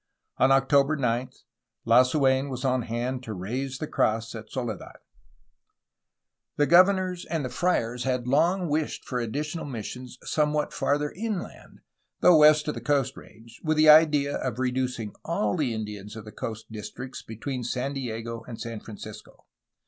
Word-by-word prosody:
On 130 Hz, -, +5 dB
October 140 Hz, +2 st, +4 dB
9 125 Hz, -2 st, 0 dB, 0.6 s
Lasu6n 130 Hz, +3 st, +4 dB
was 130 Hz, 0 st, -4 dB
on 130 Hz, -1 st, +2 dB
hand 120 Hz, +3 st, -3 dB
to 110 Hz, -4 st, -6 dB
raise 125 Hz, +8 st, -4 dB
the 155 Hz, -, -4 dB
cross 115 Hz, -5 st, 0 dB
at 110 Hz, -1 st, -9 dB
Soledad. 125 Hz, -3 st, -5 dB, 1.6 s
The 145 Hz, -, +4 dB
governors 185 Hz, +1 st, +4 dB
and 160 Hz, -5 st, -2 dB
the -, -, -3 dB
friars 125 Hz, -6 st, 0 dB
had 125 Hz, -2 st, -1 dB
long 170 Hz, +7 st, +2 dB
wished 150 Hz, 0 st, -2 dB
for 125 Hz, -, -2 dB
additional 150 Hz, +8 st, -3 dB
missions 125 Hz, 0 st, -7 dB
somewhat 150 Hz, -1 st, 0 dB
farther 150 Hz, +1 st, 0 dB
inland, 210 Hz, -1 st, -6 dB, 0.4 s
though 175 Hz, -, +7 dB
west 150 Hz, 0 st, +6 dB
of 150 Hz, -, 0 dB
the -, -, -7 dB
Coast 140 Hz, -2 st, +1 dB
Range, 115 Hz, +1 st, -15 dB
with 155 Hz, -1 st, +1 dB
the 155 Hz, 0 st, +6 dB
idea 150 Hz, -2 st, +6 dB
of 125 Hz, -3 st, -3 dB
reducing 125 Hz, -4 st, -2 dB
all 170 Hz, +4 st, 0 dB
the 145 Hz, -8 st, 0 dB
Indians 105 Hz, -1 st, -6 dB
of 110 Hz, -1 st, -9 dB
the 105 Hz, -, -9 dB
coast 110 Hz, 0 st, -6 dB
districts 110 Hz, +4 st, -7 dB
between 125 Hz, +3 st, -5 dB
San 125 Hz, +3 st, -2 dB
Diego 115 Hz, -3 st, -5 dB
and 120 Hz, -2 st, -8 dB
San 115 Hz, -2 st, -5 dB
Francisco. 105 Hz, -2 st, -11 dB
130 Hz, 155 wpm, -26 LUFS, 115-150 Hz, 1.6 s, though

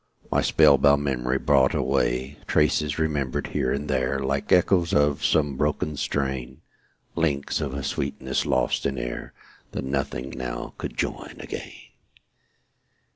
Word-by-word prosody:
My -, -, +3 dB
spell 70 Hz, -, +5 dB
bound 70 Hz, +1 st, +4 dB
memory 65 Hz, -2 st, 0 dB
brought 65 Hz, -2 st, +3 dB
away; 65 Hz, +4 st, 0 dB
Traces, 75 Hz, -1 st, +2 dB
remembered 75 Hz, -5 st, -1 dB
here 65 Hz, -, 0 dB
and 70 Hz, +2 st, -2 dB
there, 65 Hz, -1 st, 0 dB
Like 70 Hz, 0 st, -2 dB
echoes 90 Hz, -1 st, +4 dB
of 75 Hz, 0 st, +2 dB
some 75 Hz, -3 st, +2 dB
broken 75 Hz, +1 st, 0 dB
strain; 65 Hz, -3 st, -3 dB, 0.5 s
Links 75 Hz, -4 st, 0 dB
of 70 Hz, -3 st, -3 dB
a 70 Hz, -, -4 dB
sweetness 70 Hz, -, -2 dB
lost -, -, +1 dB
in 70 Hz, -1 st, -3 dB
air, -, -, -5 dB, 0.4 s
That -, -, -3 dB
nothing 70 Hz, -1 st, -2 dB
now 65 Hz, -1 st, -5 dB
could -, -, -5 dB
join -, -, -3 dB
again. -, -, -6 dB
70 Hz, 135 wpm, -25 LUFS, 65-75 Hz, 0.5 s, spell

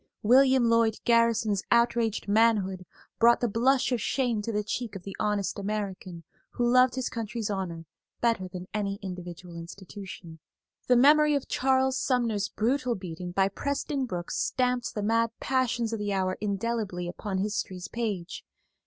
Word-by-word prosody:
William 260 Hz, +2 st, +5 dB
Lloyd 230 Hz, -1 st, +3 dB
Garrison's 230 Hz, -3 st, +3 dB
outraged 235 Hz, -2 st, +2 dB
manhood 200 Hz, -4 st, +2 dB, 0.3 s
brought 235 Hz, +1 st, +6 dB
the 240 Hz, -, +1 dB
blush 250 Hz, +4 st, +2 dB
of 245 Hz, -3 st, 0 dB
shame 245 Hz, -5 st, 0 dB
to 230 Hz, -, -3 dB
the 210 Hz, -1 st, -1 dB
cheek 220 Hz, 0 st, -4 dB
of 190 Hz, -, -7 dB
the 195 Hz, 0 st, -7 dB
honest 205 Hz, -1 st, -1 dB
American 195 Hz, -4 st, -4 dB, 0.3 s
who 240 Hz, -, 0 dB
loved 255 Hz, +1 st, +4 dB
his 260 Hz, -1 st, -2 dB
country's 225 Hz, -1 st, -4 dB
honor 175 Hz, -4 st, -4 dB, 0.3 s
better 230 Hz, -6 st, +1 dB
than 180 Hz, 0 st, -8 dB
any 200 Hz, -2 st, -1 dB
individual 180 Hz, -2 st, -8 dB
institution. 175 Hz, -1 st, -9 dB, 0.5 s
The 250 Hz, -, +5 dB
memory 300 Hz, +4 st, +6 dB
of 280 Hz, -, -2 dB
Charles 265 Hz, 0 st, +1 dB
Sumner's 230 Hz, -6 st, 0 dB
brutal 250 Hz, +2 st, 0 dB
beating 180 Hz, -2 st, -7 dB
by 190 Hz, +2 st, +2 dB
Preston 280 Hz, +5 st, -2 dB
Brooks 175 Hz, -4 st, -4 dB
stamped 250 Hz, -1 st, 0 dB
the 210 Hz, -, -2 dB
mad 230 Hz, +2 st, +2 dB
passions 245 Hz, -3 st, 0 dB
of 225 Hz, -, -2 dB
the 205 Hz, -1 st, -2 dB
hour 185 Hz, -1 st, 0 dB
indelibly 200 Hz, -3 st, -2 dB
upon 190 Hz, +2 st, -4 dB
history's 195 Hz, -2 st, -3 dB
page. 205 Hz, -6 st, -4 dB
215 Hz, 155 wpm, -28 LUFS, 190-240 Hz, 0.5 s, brought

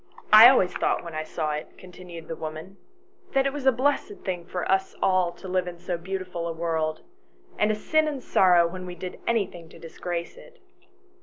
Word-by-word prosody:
I 220 Hz, +3 st, +12 dB
always 190 Hz, -9 st, +3 dB
thought -, -, 0 dB
when 170 Hz, -1 st, -8 dB
I 155 Hz, -, -2 dB
saw 155 Hz, -1 st, -3 dB
it," 150 Hz, 0 st, -6 dB
continued 180 Hz, -2 st, -11 dB
the 165 Hz, -, -5 dB
woman, 160 Hz, +5 st, -7 dB, 0.3 s
" 370 Hz, 0 st, -33 dB
that 270 Hz, 0 st, +3 dB
it 275 Hz, -, 0 dB
was 285 Hz, -2 st, -3 dB
a -, -, +8 dB
blessed 285 Hz, -, -1 dB
thing 180 Hz, -3 st, -3 dB
for 180 Hz, -, -3 dB
us 190 Hz, 0 st, +1 dB
all 185 Hz, -2 st, +2 dB
to 190 Hz, -, -11 dB
live 185 Hz, -1 st, 0 dB
in 175 Hz, -1 st, -6 dB
so 175 Hz, +1 st, -4 dB
beautiful 180 Hz, -1 st, -5 dB
a 165 Hz, -, -3 dB
world, 160 Hz, -1 st, -2 dB, 0.6 s
and 210 Hz, -, +3 dB
a 215 Hz, -, +1 dB
sin 310 Hz, +8 st, +1 dB
and 295 Hz, -2 st, -2 dB
a -, -, -10 dB
sorrow 180 Hz, -6 st, +4 dB
when 185 Hz, +1 st, -7 dB
we 180 Hz, -, -7 dB
did 180 Hz, +1 st, -7 dB
anything 195 Hz, -8 st, -1 dB
to -, -, -14 dB
disgrace 170 Hz, +1 st, -6 dB
it. 470 Hz, -2 st, -16 dB
180 Hz, 215 wpm, -26 LUFS, 170-215 Hz, 0.6 s, I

